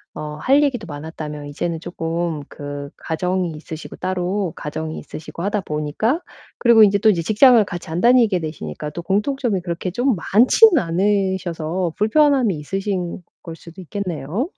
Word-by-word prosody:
어 150 0 -6
할 280 +3 +4
얘기도 245 -9 -1
많았다면 150 -1 -7
이제는 165 +3 -3
쪼끔 165 -3 -3
그 145 0 -7
가정이 180 +1 -2
있으시고 155 +1 -9
따로, 185 0 -2
가정이 155 +1 -5
있으시고 155 +2 -8
하다 205 0 0
보니까 155 - -1 0.4
그리고 235 -3 +6
인제 200 0 +4
또 220 - +4
이제 175 -5 +2
직장을 225 - +6
같이 175 -3 -7
안 165 +2 -2
다니게 235 -6 +4
되시니까 150 - -6
또 170 - -6
공통점이 210 +2 0
그렇게 175 +1 -4
좀 245 +3 +1
많지는 255 - +5
않으셔서 180 -2 -1
불편함이 250 - +3
있으신 185 +2 -3 0.2
걸 165 -1 -7
수도 170 +3 -12
있겠네요. 185 - -3
180 Hz, 360 characters per minute, -20 LUFS, 160-210 Hz, 0.4 s, 그리고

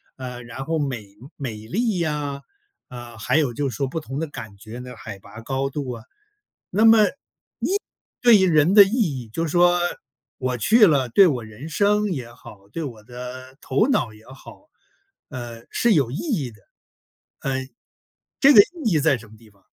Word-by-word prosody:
呃， 125 -2 -7
然 125 +3 -7
后 160 +1 -1
美 130 -7 -3 0.3
美 125 -7 -5
丽 220 - 0
呀， 145 -3 -2 0.5
啊， 120 -2 -10
还 105 - -1
有 145 -6 +2
就 140 +2 -1
说 135 +4 -2
不 150 +5 -4
同 135 -2 -7
的 160 +1 -2
感 110 -8 -9
觉 110 +4 -10
呢， 125 -1 -9
海 100 -1 -9
拔 105 +4 -12
高 135 +3 -2
度 135 -2 -4
啊。 115 -2 -8 0.7
那 210 +4 +2
么 225 -1 +7
你 - - 0 1.1
对 240 -3 +7
于 190 - +3
人 160 +4 +4
的 205 - +11
意 195 - -4
义， 150 - -1
就 165 +5 -1
说 175 +2 +4 0.6
我 130 -2 -2
去 215 - +5
了， 135 -6 +2
对 185 +9 +6
我 125 -6 -2
人 110 +8 -10
生 205 +4 +2
也 125 -7 -5
好， 100 -4 -15
对 165 - -4
我 115 -7 -7
的 125 +2 -9
头 140 - +1
脑 120 - +1
也 110 +1 -18
好， 135 - -14 0.6
呃， 120 -4 -8
是 235 -2 +2
有 135 -7 +2
意 140 - -4
义 185 - -2
的。 105 -3 -20 0.8
嗯， 130 -1 -2 0.7
这 280 +1 +7
个 210 - +8
意 320 - -3
义 155 - +3
在 145 -3 +3
什 110 -1 -14
么 110 - -16
地 110 -1 -19
方？ 100 -2 -29
135 Hz, 200 characters per minute, -23 LUFS, 120-170 Hz, 1.1 s, 的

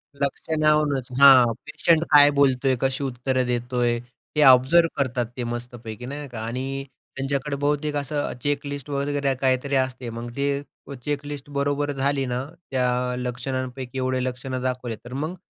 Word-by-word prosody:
लक्षणांवरूनच, 150 -1 +1
हां. 130 -4 +8
पेशंट 165 -1 +2
काय 145 -1 +9
बोलतोय 135 -1 +3
कशी 135 +1 0
उत्तरं 130 0 -1
देतोय. 120 -1 0 0.4
ते 150 - +3
ऑब्झर्व्ह 135 +6 +6
करतात 125 -3 0
ते 125 - -2
मस्तपैकी, 120 -1 -6
नाही 145 +2 -6
का? 120 -3 -7
आणि 135 +3 -4 0.3
त्यांच्याकडे 140 +1 -2
बहुतेक 145 +1 -1
असं 145 0 -2
चेक 145 0 -1
लिस्ट 140 0 -6
वगैरे 140 0 0
काहीतरी 130 +1 +1
असते. 130 -2 -1
मग 115 +1 -6
ते 140 0 0 0.4
उ 140 - -7
चेक 145 0 -2
लिस्ट 145 -1 -7
बरोबर 145 +1 0
झाली 140 0 0
ना 125 0 -2 0.3
त्या 125 -1 0
लक्षणांपैकी 125 +1 -4
एवढे 130 0 0
लक्षणं 130 0 -4
दाखवले, 125 -2 -2
तर 125 - -8
मग 155 +6 -3
135 Hz, 150 wpm, -24 LUFS, 125-145 Hz, 0.4 s, काय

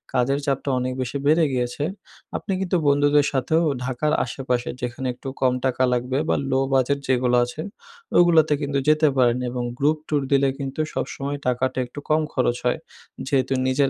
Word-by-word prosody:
কাজের 135 +3 +2
চাপটা 140 0 -1
অনেক 130 0 -2
বেশি 130 +2 -3
বেড়ে 160 +3 +5
গিয়েছে। 125 +2 -2 0.5
আপনি 195 - -4
কিন্তু 180 -1 +1
বন্ধুদের 145 0 +4
সাথেও 150 +5 +1 0.2
ঢাকার 130 +4 -1
আশেপাশে 125 -1 -2
যেখানে 125 +1 -3
একটু 125 +2 -11
কম 130 -1 +3
টাকা 130 0 +1
লাগবে 125 +2 -1
বা - - +3 0.2
লো 130 - +3
বাজেট 135 +2 +2
যেগুলা 125 -1 +2
আছে, 125 +6 -7 0.6
ওগুলাতে 165 -3 +5
কিন্তু 140 -1 0
যেতে 155 0 +4
পারেন। 125 -1 +4
এবং 125 0 -3
গ্রুপ 150 +3 +2
ট্যুর 150 -2 +1
দিলে 140 0 +4
কিন্তু 135 +1 -5
সবসময় 140 +1 -3
টাকাটা 125 +1 0
একটু 135 +4 -9
কম 155 +1 +3
খরচ 125 -2 +1
হয়। 125 +6 +1 0.5
যেহেতু 135 -1 +1
নিজের 135 +1 +2
135 Hz, 170 wpm, -23 LUFS, 125-145 Hz, 0.6 s, বেড়ে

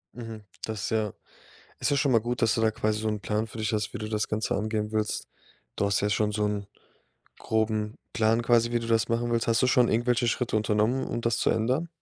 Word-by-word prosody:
Mhm. 115 -2 -7 0.2
Das 110 -1 -3
ist - - -1
ja 110 -2 0 0.7
ist - - +1
ja 145 - +2
schon 135 -1 +2
mal 115 - +5
gut, 120 +1 -3
dass 115 -1 +4
du - - 0
da 110 0 +3
quasi 110 0 -1
so 110 - -1
'n 105 -1 -2
Plan 105 +4 -1
für 115 - -10
dich 110 0 -1
hast, 105 -1 -1
wie - - -5
du 110 - -4
das 105 -1 -1
Ganze 110 0 -1
angehen 105 0 -2
willst. 110 -1 -1 0.5
Du - - +1
hast 100 0 +2
ja 105 - +1
schon 105 +1 +1
so 105 0 0
'n 105 -1 -2 0.7
groben 110 -1 -1 0.2
Plan 115 +1 +2
quasi, 120 0 +3
wie 120 - +1
du 115 - -5
das 115 -1 +2
machen 120 +1 0
willst. 115 -1 +1
Hast 115 0 +2
du - - +5
schon 125 -1 +4
irgendwelche 120 +2 +2
Schritte 120 -1 0
unternommen, 110 +4 +1
um 120 - -3
das 115 0 0
zu - - +2
ändern? 130 +9 0
110 Hz, 245 wpm, -27 LUFS, 105-120 Hz, 0.7 s, mal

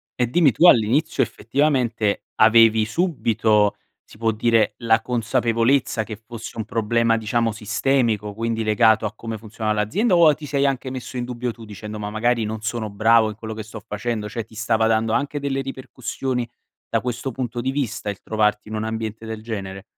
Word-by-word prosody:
E 125 -2 +1
dimmi, 150 +1 +4
tu 170 +10 +5
all'inizio 135 +5 +4
effettivamente, 120 -5 0
avevi 110 0 +5
subito, 110 - +1 0.3
si - - -17
può 115 0 +1
dire 115 +1 +2
la 115 -1 +3
consapevolezza 115 +1 +1
che 110 -1 -7
fosse 115 +1 -9
un 110 - -3
problema, 115 +1 +1
diciamo 115 +1 0
sistemico, 110 -1 0
quindi 115 +1 -2
legato 110 0 +3
a 105 - -3
come 115 -1 -6
funzionava 110 0 -3
l'azienda 185 - +1
o 170 -2 +6
a 150 - +6
ti 150 +1 -10
sei 140 -1 0
anche 135 -1 -1
messo 130 0 -7
in 120 - -2
dubbio 125 0 -3
tu 115 0 -13
dicendo: 105 +1 -8
"Ma 105 0 -4
magari 115 +2 +1
non 110 0 -4
sono 110 -1 -3
bravo 110 +2 +4
in 105 - -7
quello 110 +1 -7
che 110 0 -6
sto 110 +1 -9
facendo." 105 0 -3
Cioè, 115 +1 -4
ti 110 0 -18
stava 110 +1 +1
dando 110 0 +1
anche 145 +3 -1
delle 140 -1 -2
ripercussioni 130 -1 -4 0.4
da - - 0
questo 125 +1 -3
punto 120 -1 -4
di 130 +2 -1
vista 115 -7 -3
il 100 -3 -6
trovarti 105 -1 0
in 110 - -5
un 110 - -2
ambiente 110 0 -4
del 110 -1 -6
genere? 100 -4 -6
115 Hz, 190 wpm, -22 LUFS, 110-125 Hz, 0.4 s, o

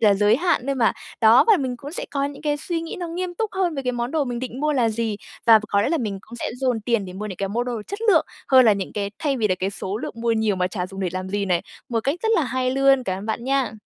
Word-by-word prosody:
à, 210 -3 +5
giới 210 +3 +4
hạn 340 -4 +1
thôi 275 - 0
mà. 235 -4 +3 0.3
Đó, 225 +2 +7
và 425 - +7
mình 260 -4 -2
cũng 285 +5 -9
sẽ - - -3
có 280 -1 -1
những 285 +1 -6
cái 295 -1 0
suy 330 +2 -3
nghĩ 330 - -6
nó 350 -2 -4
nghiêm 355 +1 -4
túc 440 +3 -2
hơn 365 -4 0
với 275 - -3
cái 250 -1 -1
món 240 +1 -2
đồ 310 -3 +1
mình 245 -2 -3
định 255 +1 -5
mua 300 - +1
là 245 -5 +2
gì. 220 -1 -2 0.3
Và 225 -1 +9
ph - - -11
có 200 0 +2
lẽ - - +1
là 325 +1 +1
mình 205 -5 -3
cũng 235 +4 -12
sẽ - - -3
dồn 250 -4 0
tiền 230 -2 0
để 180 - -8
mua 210 +3 -5
những 190 -4 -6
cái 195 -1 -2
mua 235 +4 -1
đồ 240 -3 -4
chất 405 - -5
lượng 330 -6 +5 0.2
hơn 260 -1 +7
là 220 - +6
những 195 -1 -3
cái 200 -1 -3
thay 285 -3 0
vì 215 -3 +1
là 185 - +2
cái 190 +2 -2
số 195 0 -4
lượng - - -6
mua 230 0 0
nhiều 220 -3 +1
mà 180 0 +1
chả 180 -1 -3
dùng 195 +1 -8
để 185 - 0
làm 185 0 -4
gì 200 +1 -1
này, 180 -3 +1 0.3
một 230 -2 0
cách 275 +6 0
rất 445 - +1
là 330 - +3
hay 255 +1 -1
luôn. 270 0 +4
Cảm 185 0 -2
ơn 205 - -8
bạn 230 +2 -3
nha! 265 -4 +1
235 Hz, 325 wpm, -23 LUFS, 205-275 Hz, 0.3 s, Và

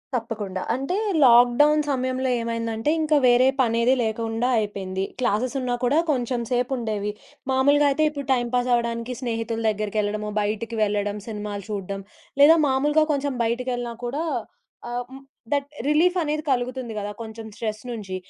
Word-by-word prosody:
తప్పకుండా. 210 -5 -3
అంటే 275 +8 -2 0.3
లాక్‌డౌన్ 250 +5 +6
సమయంలో 260 -1 -1
ఏమైందంటే 230 +2 -1
ఇంకా 310 -1 +3
వేరే 245 +1 +5
పనేది 235 +1 +3
లేకుండా 225 +2 -1
అయిపోయింది. 195 -3 -3 0.2
క్లాసెస్ 245 +2 0
ఉన్నా 250 -1 -1
కూడా 270 +6 +3
కొంచెం 250 -2 -1
సేపుండేవి. 235 -5 -1 0.4
మామూలుగా 285 +3 +4
అయితే 300 +3 +1
ఇప్పుడు 285 -2 -6
టైమ్ 240 -2 0
పాస్ 245 0 +1
అవ్వడానికి 235 +1 -1
స్నేహితుల 230 -2 -2
దగ్గరికెళ్ళడము, 210 0 -2
బయటికి 215 +3 -2
వెళ్ళడం, 205 0 -1
సినిమాలు 210 -2 -5
చూడడం 195 -1 -4 0.4
లేదా 305 +3 +9
మామూలుగా 295 +4 +3
కొంచెం 285 -1 -1
బయటికెళ్ళినా 245 +1 -2
కూడా 280 +7 -2 0.7
ఆహ్, 245 0 -3
ము 270 - -8 0.3
దట్ 285 -1 +1 0.2
రిలీఫ్ 340 +5 +3
అనేది 305 -1 -1
కలుగుతుంది 250 -2 -1
గదా! 205 0 -3
కొంచెం 225 0 -8
స్ట్రెస్ 215 -2 -4
నుంచి. 210 -6 -5
240 Hz, 140 wpm, -24 LUFS, 220-265 Hz, 0.7 s, లేదా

